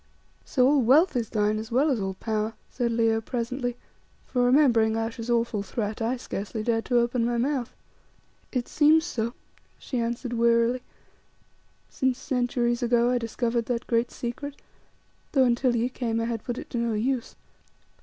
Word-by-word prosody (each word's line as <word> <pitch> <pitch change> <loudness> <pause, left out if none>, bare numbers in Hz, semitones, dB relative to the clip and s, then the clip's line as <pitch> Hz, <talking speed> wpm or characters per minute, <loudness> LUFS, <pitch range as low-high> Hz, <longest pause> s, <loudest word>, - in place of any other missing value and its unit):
"So 255 -3 +2
all 285 0 +4
wealth 290 +8 +4
is 235 -3 -1
thine, 210 0 +1
as 220 +2 -7
well 280 +6 +3
as 250 - 0
all 190 -1 -3
power," 215 +1 -2 0.2
said 240 -2 -1
Leo, 225 -1 +2
presently, 245 +1 -3 0.5
for 250 -1 0
remembering 245 -4 +4
Ayesha's 225 +1 -4
awful 230 -3 +1
threat 210 +2 -4
I 235 +3 0
scarcely 215 -2 -5
dared 225 -1 0
to 245 - +2
open 240 0 +2
my 240 0 0
mouth. 255 0 -1 0.8
"It 250 -3 -2
seems 315 +2 +4
so," 235 -6 -3 0.4
she 255 - -4
answered 235 +1 -2
wearily, 235 +1 +3 1.1
"since 260 -1 0
centuries 245 -2 0
ago 240 0 +3
I 250 - +2
discovered 230 0 -1
that 245 -1 -2
great 235 0 +1
secret, 285 +5 -6 0.7
though 270 -3 +5
until 245 0 +2
ye 235 +1 +1
came 235 -3 -2
I 230 - 0
had 230 -2 -3
put 245 -1 -4
it - - -8
to 240 - -1
no 235 -1 0
use. 240 +3 -1
240 Hz, 165 wpm, -26 LUFS, 230-250 Hz, 1.1 s, though